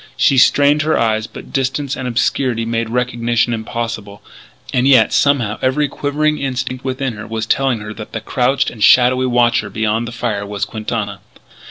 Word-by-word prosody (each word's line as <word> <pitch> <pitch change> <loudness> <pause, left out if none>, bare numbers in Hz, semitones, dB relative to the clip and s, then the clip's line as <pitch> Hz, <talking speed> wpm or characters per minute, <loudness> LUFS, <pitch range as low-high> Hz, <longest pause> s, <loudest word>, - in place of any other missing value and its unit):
She 135 - +4
strained 145 +3 +4
her 155 +1 +1
eyes; 110 -1 0
but - - -12
distance 135 +2 -1
and 130 -3 -5
obscurity 120 0 0
made 115 0 -2
recognition 120 0 0
impossible. 110 -2 -5 0.5
And 125 +1 +2
yet, 130 -5 +5
somehow, 125 -7 +1
every 135 +3 +1
quivering 150 +2 -1
instinct 130 -1 -3
within 130 -1 -2
her 110 - -8
was 110 0 -3
telling 130 -1 0
her 105 0 -7
that 110 -1 -9
the 115 - -4
crouched 125 +4 0
and 110 -3 -5
shadowy 130 +1 +5
watcher 120 0 +2
beyond 110 +1 -1
the - - -6
fire 115 -4 -3
was 100 0 -3
Quintana. 105 -2 -4
120 Hz, 170 wpm, -17 LUFS, 110-130 Hz, 0.5 s, yet